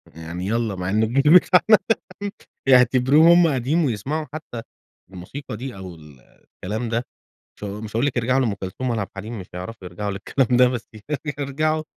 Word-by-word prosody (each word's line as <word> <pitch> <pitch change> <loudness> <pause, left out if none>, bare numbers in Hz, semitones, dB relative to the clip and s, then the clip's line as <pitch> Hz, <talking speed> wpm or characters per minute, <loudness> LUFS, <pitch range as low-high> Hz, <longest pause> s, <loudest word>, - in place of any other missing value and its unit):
يعني 85 +3 -6
يالّا 115 -2 -1
مع 90 0 -3
إنه 110 +3 +2
الجيل 140 +8 +4
بتاعنا 185 +4 +6 0.9
يعتبرُوه 130 +5 +6
هُم 175 -1 +6
قديم 145 +6 +1
ويسمعوا 135 +7 -2
حتى 140 -7 -7 0.5
الموسيقى 105 +6 -8
دي، 130 -1 -6
أو 95 -3 -8
ال 75 -5 -16
الكلام 110 - -7
ده، 115 +1 -1 0.5
مش - - -12
ها 105 +1 -6
مش 110 -1 -7
هاقول 120 - +2
لِك 135 -3 -1
يرجعوا 125 +3 +2
لأم 115 -5 0
كلثوم 95 +7 -5
ولا 115 -3 -1
عبد 100 - -5
الحليم، 110 +3 -6
مش 90 - -9
حيعرفوا 90 +1 -7
يرجعوا 100 +3 -4
للكلام 120 +5 0
ده 125 0 +6
بس 120 -3 -5 0.5
يرجعوا 155 +3 0
115 Hz, 175 wpm, -22 LUFS, 100-135 Hz, 0.9 s, بتاعنا